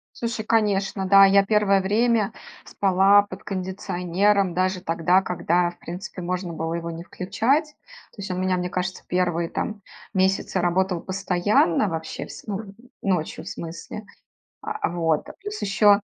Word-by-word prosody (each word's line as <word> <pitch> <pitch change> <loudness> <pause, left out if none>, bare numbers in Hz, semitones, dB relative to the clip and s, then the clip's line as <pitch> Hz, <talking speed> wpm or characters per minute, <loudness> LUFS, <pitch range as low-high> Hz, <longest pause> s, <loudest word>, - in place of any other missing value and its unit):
Слушай, 230 -2 -3
конечно, 200 -3 +1
да, 195 0 +8
я 195 0 +6
первое 200 -1 +3
время 220 +2 +2 0.3
спала 195 +1 +4
под 200 -1 -11
кондиционером, 190 0 0
даже 185 +1 0
тогда, 170 +3 +2
когда, 175 -1 +1
в 175 - -18
принципе, 185 +3 -7
можно 180 0 -3
было 165 0 -3
его 170 0 -4
не 165 0 -7
включать. 225 - 0 0.5
То - - -24
есть 195 -1 -6
у - - -1
меня, 185 0 0
мне 180 0 -2
кажется, 180 +1 -3
первые 175 -2 0
там, 210 -1 -4 0.3
месяцы 190 0 +1
работал 180 0 +1
постоянно, 185 0 +1
вообще, 160 -2 -5
вс - - -11
ну, 200 -1 -5 0.3
ночью, 180 -5 -1
в - - -7
смысле, 170 +5 -7 0.6
а, 430 -1 -2
вот. 165 -3 0
Плюс, 415 +1 -6
ещё, 205 0 +5
190 Hz, 150 wpm, -24 LUFS, 175-205 Hz, 0.6 s, да